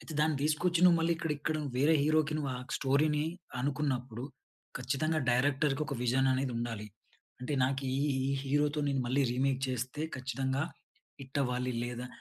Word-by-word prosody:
అయితే 160 - -9
దాన్ని 155 0 +2
తీసుకొచ్చి 165 +3 +2
నువ్వు 175 -2 +7
మళ్ళీ 165 +1 +2
ఇక్కడ 165 -1 -3
ఇక్కడ 155 +2 -1 0.2
వేరే 145 +4 +4
హీరోకి 155 0 +2
నువ్వు 145 -3 -2
ఆ - - -6 0.2
స్టోరీని 150 +2 +2 0.4
అనుకున్నప్పుడు 130 -4 -2 0.5
ఖచ్చితంగా 145 +5 0
డైరెక్టర్‌కు 135 +3 +2
ఒక 140 - -3
విజన్ 130 +2 +2
అనేది 130 -1 0
ఉండాలి. 115 -3 -4 0.5
అంటే 125 +4 -3
నాకు 135 +1 -1
ఈ, - - 0 0.3
ఈ - - 0
హీరోతో 145 +2 +1
నేను 135 -1 +1
మళ్ళీ 130 +3 +2
రీమేక్ 130 +1 +1
చేస్తే 130 +3 -3 0.2
ఖచ్చితంగా 130 +1 -1 0.6
హిట్ 135 +1 -4
అవ్వాలి. 125 0 -1
లేదా 120 0 -5
135 Hz, 155 wpm, -32 LUFS, 130-150 Hz, 0.6 s, నువ్వు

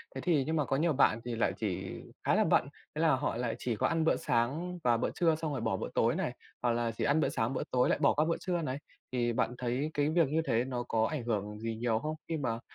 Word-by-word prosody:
Thế - - -4
thì 160 -6 +2
nhưng 160 - -1
mà 150 -3 +1
có 135 - 0
nhiều 160 +3 +2
bạn 120 -5 +4
thì 120 -1 -3
lại 115 - +1
chỉ 95 -3 -3 0.3
khá - - +3
là - - +4
bận, - - +3 0.3
thế 155 - -1
là 160 -4 +4
họ 130 - -1
lại 120 -2 -1
chỉ 120 -2 -1
có - - +1
ăn 165 -1 +1
bữa 160 - +3
sáng 150 +10 -1
và 120 -1 +4
bữa 115 - 0
trưa 165 -2 +3
xong 160 -1 -3
rồi 135 - -3
bỏ 110 -4 0
bữa - - -4
tối - - +2
này. - - -1 0.3
Hoặc 120 - +2
là 115 0 0
chỉ - - -1
ăn 145 +2 +3
bữa - - +2
sáng, 115 +1 -1
bữa 130 - -1
tối 125 0 +3
lại - - +2
bỏ 140 - +4
qua 155 - +2
bữa 165 - 0
trưa 175 -2 -1
này. 130 -4 -2 0.3
Thì 120 -2 0
bạn 120 +1 0
thấy 125 +5 -1
cái 145 0 +1
việc 165 -1 +3
như 155 +4 +1
thế 115 -3 +2
nó 125 -2 -3
có 110 -2 +1
ảnh 150 -6 -2
hưởng 105 -2 -2
gì 115 0 -3
nhiều 115 -1 0
không? 155 +5 -3
Khi 165 - -1
mà 115 -6 -2
130 Hz, 285 wpm, -31 LUFS, 115-155 Hz, 0.3 s, bạn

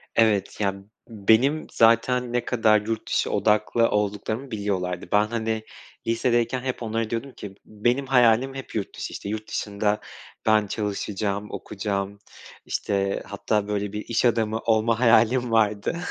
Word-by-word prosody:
Evet, 110 -4 +2
ya 100 -1 +1 0.3
benim 115 +8 +2
zaten 120 +2 +3
ne 120 -1 0
kadar 110 -3 +3
yurt 110 +1 -4
dışı - - 0
odaklı 110 +2 +2
olduklarımı 105 +5 -2
biliyorlardı. 95 -4 -2
Ben 105 +1 +4
hani 110 -1 -2 0.4
lisedeyken 120 +1 +1
hep 130 -2 -4
onlara 115 0 -2
diyordum 120 +4 -3
ki 100 -4 -9
benim 120 +6 0
hayalim 125 0 +4
hep 135 - -8
yurt 105 - -3
dışı - - -5
işte 100 - -6
yurt 110 0 -4
dışında 105 0 -1 0.5
ben 110 -1 +3
çalışacağım, 105 0 -3
okuyacağım 100 0 -4 0.5
işte 100 -1 -1
hatta 105 -1 -1
böyle 105 0 -2
bir 105 - -5
iş 115 +1 +1
adamı 110 -2 +1
olma 115 0 +1
hayalim 120 +1 +4
vardı. 105 +5 +1
110 Hz, 140 wpm, -24 LUFS, 105-115 Hz, 0.5 s, Ben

